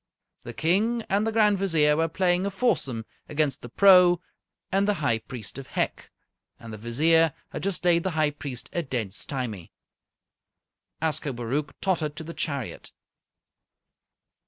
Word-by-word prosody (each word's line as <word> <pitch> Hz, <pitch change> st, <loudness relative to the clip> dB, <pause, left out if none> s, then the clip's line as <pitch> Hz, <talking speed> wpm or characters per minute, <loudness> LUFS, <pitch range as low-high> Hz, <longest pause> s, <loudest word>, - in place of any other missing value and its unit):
The -, -, -8 dB
King 215 Hz, +8 st, +1 dB
and 205 Hz, +3 st, +1 dB
the -, -, +1 dB
Grand 210 Hz, -3 st, +3 dB
Vizier 160 Hz, -6 st, +3 dB
were 165 Hz, +1 st, +1 dB
playing 180 Hz, +2 st, +1 dB
a -, -, 0 dB
foursome 140 Hz, -, -1 dB, 0.2 s
against 150 Hz, -2 st, 0 dB
the 120 Hz, -, -9 dB
Pro 180 Hz, -, +6 dB, 0.5 s
and 195 Hz, +1 st, +2 dB
the 210 Hz, -, +2 dB
High 140 Hz, -9 st, +1 dB
Priest 115 Hz, +1 st, -8 dB
of 135 Hz, -, -9 dB
Hec, -, -, -2 dB, 0.5 s
and 115 Hz, -1 st, -9 dB
the -, -, -6 dB
Vizier 155 Hz, +7 st, +3 dB
had -, -, -6 dB
just 195 Hz, -2 st, -2 dB
laid 170 Hz, -1 st, +4 dB
the 190 Hz, -, -1 dB
High 155 Hz, -1 st, +3 dB
Priest 140 Hz, -4 st, -6 dB
a 170 Hz, -, 0 dB
dead 120 Hz, -, -3 dB
stymie. 115 Hz, -, -4 dB, 1.3 s
Ascobaruch 140 Hz, -3 st, -2 dB
tottered 160 Hz, -6 st, 0 dB
to 160 Hz, -, -6 dB
the 165 Hz, +2 st, -8 dB
chariot. 140 Hz, -8 st, -5 dB
155 Hz, 150 wpm, -26 LUFS, 130-185 Hz, 1.3 s, Pro